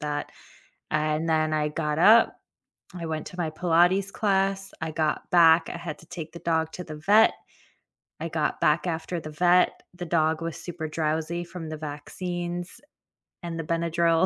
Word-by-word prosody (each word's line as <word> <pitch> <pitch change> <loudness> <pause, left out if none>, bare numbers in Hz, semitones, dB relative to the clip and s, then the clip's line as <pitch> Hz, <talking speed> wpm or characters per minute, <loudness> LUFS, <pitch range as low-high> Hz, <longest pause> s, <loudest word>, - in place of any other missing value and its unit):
that. 150 -1 -3 0.6
And 155 +1 0
then 155 -1 +2
I 150 -1 +1
got 150 0 -2
up, 220 +7 +6 0.6
I 175 -2 -6
went 160 -1 -3
to 180 - -11
my 170 -3 -1
Pilates 175 +4 +2
class, 195 -1 0
I 160 - -2
got 155 -1 -1
back, 165 -1 +6
I - - -5
had 165 -3 -6
to - - -16
take 160 -3 -7
the 170 - -8
dog 160 -1 0
to 180 - -6
the 155 -3 -8
vet, 205 +8 +5 0.9
I 165 - -3
got 155 -2 -1
back 150 +4 +2
after 170 0 -3
the 155 - -8
vet, 175 +3 +3
the 175 0 -6
dog 160 -1 +1
was 165 -1 -4
super 170 -2 -6
drowsy 160 +2 -2
from 170 -2 -8
the 155 - -5
vaccines 175 - -5 0.6
and 170 -1 -5
the - - -2
Benadryl, 165 +1 +2
165 Hz, 175 wpm, -26 LUFS, 155-175 Hz, 0.9 s, up